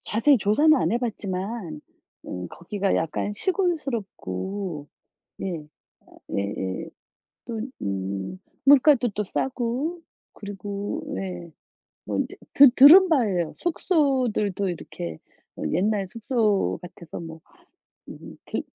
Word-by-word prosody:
자세히 240 Hz, +6 st, +3 dB
조사는 235 Hz, +11 st, +4 dB
안 170 Hz, -3 st, +1 dB
해봤지만 200 Hz, -7 st, -3 dB, 0.5 s
음 90 Hz, -1 st, -5 dB
거기가 195 Hz, +3 st, -2 dB
약간 165 Hz, +5 st, -1 dB
시골스럽고 205 Hz, -, -2 dB, 0.5 s
네 170 Hz, -6 st, -4 dB, 0.7 s
예예 100 Hz, -2 st, -3 dB, 0.6 s
또 230 Hz, -2 st, -4 dB, 0.2 s
음 95 Hz, -, -3 dB, 0.3 s
물가도 275 Hz, -3 st, +6 dB
또 210 Hz, 0 st, -3 dB
싸고 260 Hz, -, -2 dB, 0.3 s
그리고 205 Hz, -, -5 dB
예 175 Hz, -3 st, -6 dB, 0.5 s
뭐 -, -, -2 dB
이제 -, -, -2 dB, 0.2 s
드 280 Hz, -2 st, +9 dB
들은 315 Hz, +9 st, +9 dB
바예요 200 Hz, -, +1 dB
숙소들도 255 Hz, -, +1 dB
이렇게 85 Hz, -, -6 dB, 0.4 s
뭐 -, -, -5 dB
옛날 200 Hz, +3 st, +1 dB
숙소 220 Hz, -1 st, 0 dB
같아서 175 Hz, -2 st, -9 dB
뭐 165 Hz, -1 st, -9 dB, 0.7 s
음 -, -, -10 dB
그 -, -, -2 dB
205 Hz, 205 characters per minute, -25 LUFS, 175-255 Hz, 0.7 s, 드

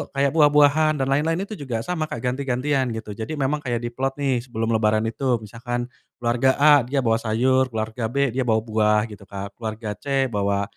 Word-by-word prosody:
kayak 140 Hz, 0 st, +2 dB
buah-buahan 150 Hz, 0 st, +4 dB
dan -, -, -2 dB
lain-lain 165 Hz, +6 st, +1 dB
itu 210 Hz, +1 st, -8 dB
juga 120 Hz, -5 st, -3 dB
sama 160 Hz, -1 st, -2 dB
Kak 120 Hz, -5 st, -6 dB
ganti-gantian 130 Hz, +1 st, 0 dB
gitu 110 Hz, -1 st, -6 dB
jadi 110 Hz, +9 st, -5 dB
memang 145 Hz, +1 st, 0 dB
kayak 120 Hz, -4 st, -3 dB
diplot 130 Hz, +3 st, -2 dB
nih 135 Hz, -3 st, 0 dB
sebelum 115 Hz, -1 st, -2 dB
lebaran 110 Hz, -1 st, +2 dB
itu 125 Hz, +2 st, 0 dB
misalkan, 120 Hz, +3 st, -4 dB, 0.3 s
keluarga 120 Hz, +2 st, +2 dB
A 145 Hz, 0 st, +6 dB
dia 135 Hz, 0 st, 0 dB
bawa 115 Hz, -1 st, +2 dB
sayur, 130 Hz, +4 st, +2 dB
keluarga 110 Hz, 0 st, -3 dB
B 140 Hz, +2 st, 0 dB
dia 130 Hz, +2 st, -1 dB
bawa 110 Hz, -1 st, +3 dB
buah 105 Hz, -1 st, +2 dB
gitu, 100 Hz, -1 st, -12 dB
Kak 100 Hz, +2 st, -8 dB
keluarga 110 Hz, -1 st, -4 dB
C 135 Hz, -1 st, 0 dB
bawa 100 Hz, -1 st, 0 dB
125 Hz, 190 wpm, -23 LUFS, 110-140 Hz, 0.3 s, A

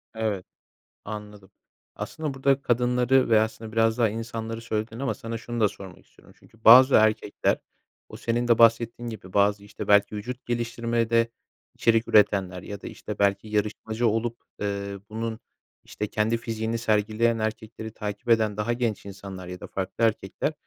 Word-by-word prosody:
Evet, 110 Hz, -4 st, -2 dB, 0.6 s
anladım. 105 Hz, -2 st, -8 dB, 0.5 s
Aslında 155 Hz, -3 st, -4 dB
burada 135 Hz, +1 st, +1 dB
hep 135 Hz, 0 st, +2 dB
kadınları 125 Hz, +2 st, +2 dB
ve 110 Hz, -1 st, +6 dB
aslında 110 Hz, 0 st, -3 dB
biraz 115 Hz, +1 st, +2 dB
daha 115 Hz, -2 st, +4 dB
insanları 115 Hz, +1 st, -5 dB
söyledin 110 Hz, 0 st, -3 dB
ama 130 Hz, -5 st, -1 dB
sana 115 Hz, +2 st, -6 dB
şunu 120 Hz, +1 st, -5 dB
da 105 Hz, -, +5 dB
sormak 95 Hz, -2 st, -12 dB
istiyorum. -, -, -21 dB
Çünkü 110 Hz, 0 st, -23 dB
bazı 130 Hz, +4 st, +9 dB
erkekler 110 Hz, -1 st, +3 dB, 0.5 s
o -, -, -10 dB
senin 120 Hz, +1 st, -1 dB
de 115 Hz, -, +4 dB
bahsettiğin 115 Hz, +1 st, +3 dB
gibi 95 Hz, -5 st, -10 dB
bazı, 100 Hz, 0 st, +2 dB
işte, 100 Hz, -, -8 dB
belki 100 Hz, +1 st, +4 dB
vücut 120 Hz, +5 st, -6 dB
geliştirmede 115 Hz, -1 st, 0 dB, 0.5 s
içerik 115 Hz, 0 st, +2 dB
üretenler 95 Hz, -4 st, +3 dB
ya 100 Hz, -1 st, -7 dB
da, -, -, -9 dB
işte, -, -, -7 dB
belki 100 Hz, +1 st, +1 dB
yarışmacı 110 Hz, +2 st, -1 dB
olup, 115 Hz, +2 st, -1 dB, 0.2 s
eee, 100 Hz, -1 st, -3 dB
bunun, 110 Hz, +1 st, -4 dB, 0.4 s
işte, 105 Hz, -, -4 dB
kendi 110 Hz, +2 st, 0 dB
fiziğini 115 Hz, 0 st, -3 dB
sergileyen 110 Hz, +1 st, +1 dB
erkekleri 110 Hz, 0 st, -4 dB
takip 105 Hz, 0 st, -6 dB
eden 110 Hz, -3 st, +3 dB
daha 105 Hz, +3 st, 0 dB
genç 120 Hz, -4 st, -2 dB
insanlar 95 Hz, -2 st, -8 dB
ya 90 Hz, 0 st, -7 dB
da -, -, -7 dB
farklı 95 Hz, +4 st, -2 dB
erkekler, 110 Hz, +5 st, 0 dB
110 Hz, 160 wpm, -26 LUFS, 105-115 Hz, 0.6 s, bazı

